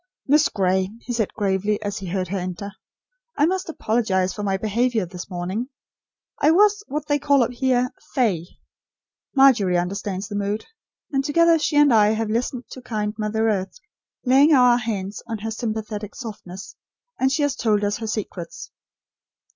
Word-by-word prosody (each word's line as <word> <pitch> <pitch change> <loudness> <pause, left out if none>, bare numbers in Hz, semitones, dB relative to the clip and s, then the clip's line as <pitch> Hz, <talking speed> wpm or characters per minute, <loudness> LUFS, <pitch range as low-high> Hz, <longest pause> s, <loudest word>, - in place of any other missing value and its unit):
"Miss 295 +2 +4
Gray," 190 -1 +1
he 245 - -5
said 225 -4 0
gravely, 205 +1 0
as 205 0 -3
he 190 - -7
heard 185 0 -2
her 200 - -2
enter, 185 +3 -5 0.7
"I 295 - +4
must 370 +1 -1
apologise 215 - 0
for 210 - -6
my 195 -2 0
behaviour 220 +1 0
this 180 +1 -9
morning. 185 +7 -3 0.7
I 295 - +5
was 410 +4 +4
what 300 +1 -3
they 290 -1 +1
call 280 -2 +4
up 235 - -2
here 250 0 +1 0.2
'fey.' 195 - +1 0.9
Margery 240 -10 +5
understands 195 +2 -3
the 210 - -8
mood; 205 +1 -2 0.5
and 270 -1 +1
together 330 +3 +4
she 300 - -1
and 290 -3 +6
I 215 -1 +5
have 220 -1 -2
listened 245 +2 -1
to 260 - -8
kind 210 -4 -3
Mother 220 +1 0
Earth, 195 -3 -1 0.5
laying 275 +4 +6
our 250 -2 +5
hands 205 -4 -4
on 225 -1 -3
her 220 +2 -5
sympathetic 215 -2 -4
softness, 205 -6 -8 0.4
and 265 0 +2
she 295 +2 +1
has 285 -2 +1
told 210 -5 +1
us 205 0 0
her 225 - -5
secrets. 200 -6 -5
220 Hz, 170 wpm, -23 LUFS, 200-260 Hz, 0.9 s, and